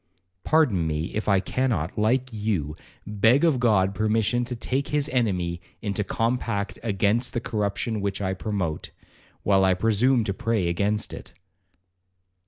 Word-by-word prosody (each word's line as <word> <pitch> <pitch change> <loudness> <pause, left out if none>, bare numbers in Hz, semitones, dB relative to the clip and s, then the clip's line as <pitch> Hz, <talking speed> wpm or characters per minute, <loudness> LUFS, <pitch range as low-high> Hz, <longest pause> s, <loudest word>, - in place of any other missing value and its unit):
Pardon 125 - +2
me, 80 +2 -3
if 110 0 -2
I 100 -1 +4
cannot, 100 - -1
like 125 +4 +1
you, 100 -9 -2 0.3
beg 110 - +3
of 155 -7 +3
God 100 -5 +3
permission 110 +4 +1
to 125 0 -4
take 130 +4 -2
his 150 -1 0
enemy 90 - -1 0.2
into 105 0 -2
compact 115 -1 -2
against 110 +2 +1
the 120 - 0
corruption 110 0 -2
which 100 -1 -2
I 95 -2 -1
promote, 95 -5 -3 0.5
while 95 -1 +3
I 95 -1 +4
presume 115 +5 +2
to 100 -2 -2
pray 105 -2 -1
against 105 +5 0
it.' - - -10
105 Hz, 145 wpm, -25 LUFS, 95-120 Hz, 0.5 s, I